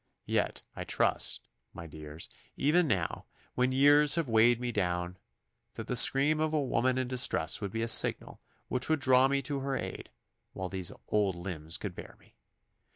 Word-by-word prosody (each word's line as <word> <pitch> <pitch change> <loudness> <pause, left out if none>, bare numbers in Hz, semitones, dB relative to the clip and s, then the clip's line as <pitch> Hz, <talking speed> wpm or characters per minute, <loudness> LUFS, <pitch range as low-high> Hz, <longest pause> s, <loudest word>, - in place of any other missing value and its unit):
Yet - - -2
I - - -5
trust, - - 0 0.3
my 85 - -8
dears, 75 0 -9 0.3
even 160 +4 +2
now, 95 - -2 0.3
when 125 +1 0
years 145 +2 +4
have 165 -4 -1
weighed 115 +1 +3
me 125 -1 -3
down, 90 -3 -2 0.6
that 110 - -6
the 125 - -3
scream 140 +5 +5
of 155 0 -1
a 155 - +1
woman 130 -2 0
in 130 -1 -1
distress 125 -11 +1
would 100 - -3
be 115 +2 -3
a - - -2
signal 115 - +2 0.3
which 130 +3 -2
would 160 -1 +1
draw 130 -1 +4
me 140 0 -1
to 140 +1 -3
her 135 0 -3
aid - - -7 0.4
while 95 -1 -5
these 95 -2 -4 0.2
old 100 -3 +1
limbs 85 -3 -6
could - - -6
bear - - -11
me. - - -25
125 Hz, 180 wpm, -30 LUFS, 95-140 Hz, 0.6 s, scream